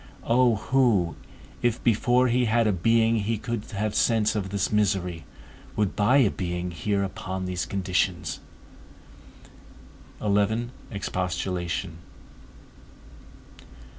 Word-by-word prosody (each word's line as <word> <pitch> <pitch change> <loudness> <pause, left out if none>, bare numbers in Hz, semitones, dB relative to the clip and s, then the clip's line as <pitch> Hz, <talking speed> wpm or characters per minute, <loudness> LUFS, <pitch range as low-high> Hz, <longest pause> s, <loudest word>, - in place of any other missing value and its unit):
O 120 -1 +3
who, 110 -7 +2 0.5
if 120 -1 0
before 120 +2 +3
he 125 +1 +2
had 115 +1 +2
a 105 - +3
being 115 +4 +3
he 110 +2 -1
could 115 -1 -4
have 105 -1 -3
sense 110 -3 +2
of 100 -2 -2
this 100 -1 -1
misery, 95 -5 0 0.5
would 105 -3 0
buy 115 +6 +4
a 125 -8 +4
being 90 -1 -3
here 100 +4 -1
upon 95 -1 -4
these 90 -1 -3
conditions? 90 -2 -1 1.8
XI. 105 +3 +1 0.2
EXPOSTULATION. 90 -3 -3
105 Hz, 105 wpm, -26 LUFS, 90-115 Hz, 1.8 s, buy